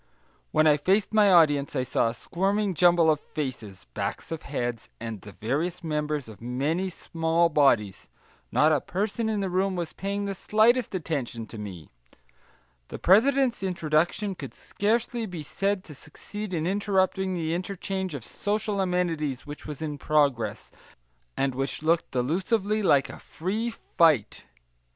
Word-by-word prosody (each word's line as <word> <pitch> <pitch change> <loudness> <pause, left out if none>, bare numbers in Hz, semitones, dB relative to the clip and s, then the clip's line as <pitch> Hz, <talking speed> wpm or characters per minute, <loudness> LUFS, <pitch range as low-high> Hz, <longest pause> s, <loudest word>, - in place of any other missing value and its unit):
When 155 0 +3
I 150 -1 +6
faced 195 +8 +1
my 210 -2 +5
audience, 145 -5 +4
I 130 - +1
saw 125 - +1
a 115 - -3
squirming 195 +2 0
jumble 175 -1 +5
of 150 - 0
faces, 120 - -6
backs - - -4
of 165 - -4
heads, 120 -5 -4
and 115 -3 -6
the 105 - -11
various 150 - -2
members 150 -3 -2
of 110 -1 -12
many 145 +10 -1
small 165 -1 0
bodies, 135 - +2 0.4
not 155 +1 +4
a 150 -4 +2
person 215 +4 -2
in 210 -2 0
the 195 - -1
room 190 +1 +1
was 170 -2 -4
paying 200 +1 -3
the 200 - -2
slightest 220 +3 +2
attention 140 -9 -3
to 110 - -10
me; 90 -8 -8 1.0
the - - -7
president's 250 +5 +4
introduction 175 +2 0
could - - -9
scarcely 225 +2 -1
be 175 -5 -6
said 195 +5 -1
to 155 - -11
succeed 205 +8 -8
in 165 -3 -1
interrupting 190 -1 +1
the 165 -2 -1
interchange 190 -1 -3
of 130 - -6
social 205 -1 -1
amenities 165 -7 -1
which 145 0 -9
was 150 0 -6
in 150 -2 -4
progress, 130 -9 +1 0.7
and 135 -1 +1
which 135 +3 -3
looked 165 +1 +2
delusively 190 - 0
like 140 -8 +4
a - - -9
free 210 +8 -3
fight. 160 - +1
165 Hz, 155 wpm, -26 LUFS, 140-195 Hz, 1.0 s, I